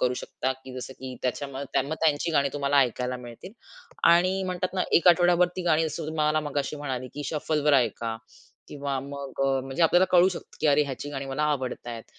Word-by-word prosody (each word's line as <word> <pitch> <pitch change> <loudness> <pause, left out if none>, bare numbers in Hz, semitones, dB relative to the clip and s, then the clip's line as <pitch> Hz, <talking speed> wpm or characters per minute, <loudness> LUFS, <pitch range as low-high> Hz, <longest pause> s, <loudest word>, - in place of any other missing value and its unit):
करू 125 0 +1
शकता. 130 - -2
की 130 0 -13
जसं 130 - -7
की 130 -1 -7
त्याच्यामध्ये 135 +1 -2
मग - - 0
त्यांची 155 +2 +2
गाणी 140 -2 +3
तुम्हाला 140 0 +1
ऐकायला 125 0 -1
मिळतील. 125 - -11 0.6
आणि 185 +3 +3
म्हणतात 185 0 -3
ना, 185 - +1
एक 170 - +5
आठवडाभर 175 +1 +5
ती 185 - -2
गाणी 165 -2 +2
जसं 155 0 -5
तुम्हाला 155 0 +1
मघाशी 145 +1 -2
म्हणाली, 130 -3 -4
की 145 0 -5
शफलवर 150 -1 +1
ऐका 115 -2 +1 0.5
किंवा 140 -2 -3
मग 140 0 -7
अ, 135 -1 +1
म्हणजे 135 +6 -3
आपल्याला 175 +3 +5
कळू 180 +1 +6
शकतं, 185 - -8
की - - +1
अरे 145 0 +5
ह्याची 140 +1 -6
गाणी 135 -1 -5
मला 135 +3 -2
आवडत 130 -3 -4
आहेत 115 -2 -6
145 Hz, 195 wpm, -26 LUFS, 130-160 Hz, 0.6 s, कळू